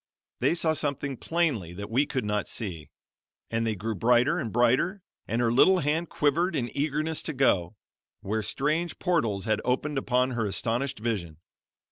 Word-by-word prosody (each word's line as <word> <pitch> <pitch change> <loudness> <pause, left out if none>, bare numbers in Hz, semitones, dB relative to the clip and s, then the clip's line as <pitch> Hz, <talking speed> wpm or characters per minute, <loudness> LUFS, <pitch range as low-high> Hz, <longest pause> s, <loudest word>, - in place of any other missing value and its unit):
They - - +2
saw 160 -2 +2
something 140 -2 -2
plainly 135 - -1
that 100 +4 -7
we 135 +5 +2
could 130 -5 -2
not 105 0 -1
see; 85 -8 -5 0.6
and 115 0 0
they 110 - 0
grew 110 +4 -3
brighter 120 - +3
and 115 - -3
brighter, 130 - +2 0.2
and 115 - -1
her 120 -1 +2
little 185 +9 +6
hand 160 +1 0
quivered 170 +4 +1
in 120 -4 -2
eagerness 155 +2 0
to 160 - -4
go, 110 - +2 0.5
where 110 +3 -1
strange 155 +9 -1
portals 115 - 0
had 110 -1 +1
opened 135 +3 0
upon 125 0 +1
her 115 -3 -1
astonished 120 +7 -1
vision. 100 -9 -3
125 Hz, 165 wpm, -27 LUFS, 110-150 Hz, 0.6 s, little